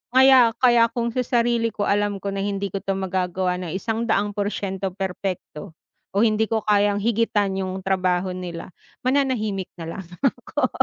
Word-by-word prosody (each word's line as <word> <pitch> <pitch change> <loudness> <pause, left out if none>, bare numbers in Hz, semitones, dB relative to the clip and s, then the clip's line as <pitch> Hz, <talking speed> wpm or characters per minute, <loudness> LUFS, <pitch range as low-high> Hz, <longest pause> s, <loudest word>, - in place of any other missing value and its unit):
Kaya 260 -3 +7
kaya 240 -2 +6
kung 235 -1 0
sa 250 +1 -2
sarili 235 -1 +1
ko 205 - -1
alam 205 -1 0
ko 200 - -1
na 195 - -3
hindi 200 0 -2
ko 195 - -2
'to 195 0 -2
magagawa 185 -1 -1
ng 175 -3 -5
100 220 0 0
porsiento 195 -2 -3
perpekto 185 -3 -5 0.4
o 200 - +3
hindi 220 -1 +3
ko 220 0 0
kayang 205 0 +3
higitan 210 -3 +1
yung 190 0 -3
trabaho 185 -1 +1
nila, 180 -1 -6 0.3
mananahimik 250 -8 0
na 165 -1 -7
lang 190 - -7 0.2
ako. 255 +1 0
200 Hz, 160 wpm, -23 LUFS, 190-230 Hz, 0.4 s, Kaya